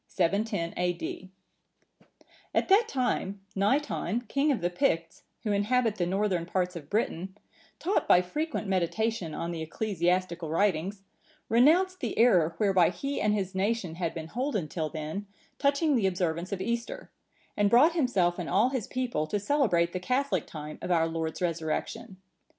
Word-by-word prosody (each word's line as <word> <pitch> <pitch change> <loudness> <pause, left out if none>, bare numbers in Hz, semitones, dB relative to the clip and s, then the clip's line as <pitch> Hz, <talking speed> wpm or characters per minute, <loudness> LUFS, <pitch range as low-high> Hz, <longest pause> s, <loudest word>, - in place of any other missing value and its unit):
[710 185 -1 0
A.D.] 180 +1 -3 1.3
At - - +1
that 425 +4 +5
time,(945) 200 - -1
Naiton, 230 - 0
King 280 +6 +2
of 265 - 0
the 175 0 -1
Picts, 165 - 0 0.2
who 215 - -1
inhabit 215 +2 +1
the 175 - 0
northern 190 -2 0
parts 180 0 -1
of 150 -4 -8
Britain, 190 -3 -2 0.4
taught 375 - 0
by 180 - +7
frequent 295 - -3
meditation 190 0 -1
on 170 - -3
the 165 -1 -4
ecclesiastical 175 -1 -1
writings, 195 +2 0 0.5
renounced 335 +11 +4
the 235 - -3
error 175 -9 +4
whereby 190 -4 +4
he 275 +11 -3
and 210 0 +2
his 190 -2 -2
nation 195 -2 -1
had 170 0 -3
been 160 -1 -6
holden 240 - -2
till 155 +1 -3
then, 160 +6 -5 0.3
touching 285 +1 +2
the 215 -6 +2
observance 175 -2 -2
of 195 -2 -3
Easter, 235 +2 -3 0.4
and 205 -1 +3
brought 275 +10 +6
himself 195 - +1
and 175 - -4
all 215 +6 +3
his 260 -5 -3
people 245 -12 -2
to 205 - -1
celebrate 200 - +2
the 185 - -2
catholic 255 +9 0
time 150 -1 -8
of - - -5
our 165 -2 +3
Lord's 160 +1 -3
Resurrection. 170 +4 -3
195 Hz, 155 wpm, -28 LUFS, 170-235 Hz, 1.3 s, by